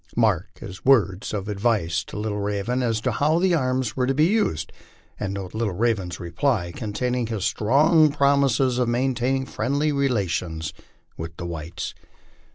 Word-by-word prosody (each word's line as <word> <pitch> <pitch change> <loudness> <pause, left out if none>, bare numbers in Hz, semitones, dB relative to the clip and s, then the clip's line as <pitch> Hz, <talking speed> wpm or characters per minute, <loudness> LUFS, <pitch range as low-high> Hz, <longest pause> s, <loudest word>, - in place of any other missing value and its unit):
Mark 105 -7 +1
his 100 +4 -9
words 105 -8 +3
of 100 -2 -3
advice 100 -6 0
to - - -8
Little 105 -1 -2
Raven 105 +5 -1
as 115 -3 0
to - - 0
how 155 +3 +2
the 180 +1 +2
arms 130 -6 0
were 125 -1 0
to 135 - +1
be 150 +3 +4
used, 180 - 0 0.5
and 100 -2 -2
note 95 -2 -6
Little 110 -4 -1
Raven's 105 -5 0
reply 85 +2 -1
containing 125 +2 -2
his 110 -4 -2
strong 150 +7 +4
promises 140 -3 +2
of 125 -2 +1
maintaining 130 +2 0
friendly 140 +4 0
relations 90 - -1 0.4
with 80 0 -7
the 85 - -5
whites. 85 -1 -5
115 Hz, 160 wpm, -24 LUFS, 95-135 Hz, 0.5 s, be